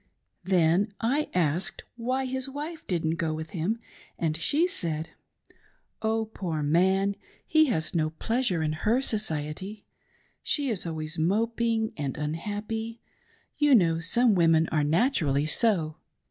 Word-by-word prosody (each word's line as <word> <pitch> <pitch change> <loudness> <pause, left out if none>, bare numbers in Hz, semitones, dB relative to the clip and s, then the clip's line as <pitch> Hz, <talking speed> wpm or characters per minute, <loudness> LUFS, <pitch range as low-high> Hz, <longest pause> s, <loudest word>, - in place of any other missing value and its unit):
Then 185 +3 +2
I 275 +7 0
asked 170 +1 0
why 255 +3 -1
his 260 +1 -2
wife 300 +4 -6
didn't 165 -2 0
go 160 -2 -1
with 160 0 -6
him, 185 +6 -1 0.4
and 160 -2 0
she 290 - +2
said: 165 - -2 0.9
"Oh, 220 0 0
poor 175 -8 -4
man! 190 +6 +2 0.3
he 315 0 +4
has 160 - -1
no 155 -2 +1
pleasure 220 +2 0
'vdher 175 - +1
society. 195 - -1 0.6
She 285 -3 0
is 185 -5 -3
always 160 0 -4
moping 225 +5 +1
and 140 -3 -3
unhappy; 210 +9 -4 0.6
you 295 -2 +6
know, 165 -6 +3
some 225 +8 +3
women 165 -3 +4
are 155 -2 +1
naturally 155 - +2
so. 160 -3 +2
190 Hz, 130 wpm, -27 LUFS, 160-230 Hz, 0.9 s, you